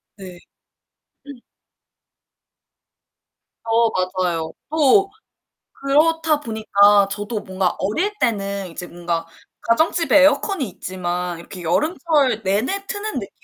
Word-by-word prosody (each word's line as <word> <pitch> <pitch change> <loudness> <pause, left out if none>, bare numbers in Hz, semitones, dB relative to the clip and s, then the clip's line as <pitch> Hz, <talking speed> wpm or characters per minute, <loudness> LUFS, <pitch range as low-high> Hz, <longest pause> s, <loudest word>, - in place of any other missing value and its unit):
네. 185 -3 -11 0.9
음. 275 -4 -10 2.2
어 230 0 +2 0.3
맞아요. 165 -2 -2 0.2
또 315 +6 +3 0.6
그렇다 310 +2 +2
보니까 205 -5 +3
저도 205 +2 -4
뭔가 185 -1 -2
어릴 330 - -1
때는 200 -3 -1
이제 175 +1 -8
뭔가 170 -1 -3 0.4
가정집에 320 +5 +3
에어컨이 290 - +2
있지만 180 -1 -4
이렇게 180 +1 -10
여름철 290 - +1
내내 250 - -1
트는 415 +1 -4
느낌은 215 -7 -5
220 Hz, 220 characters per minute, -20 LUFS, 185-300 Hz, 2.2 s, 또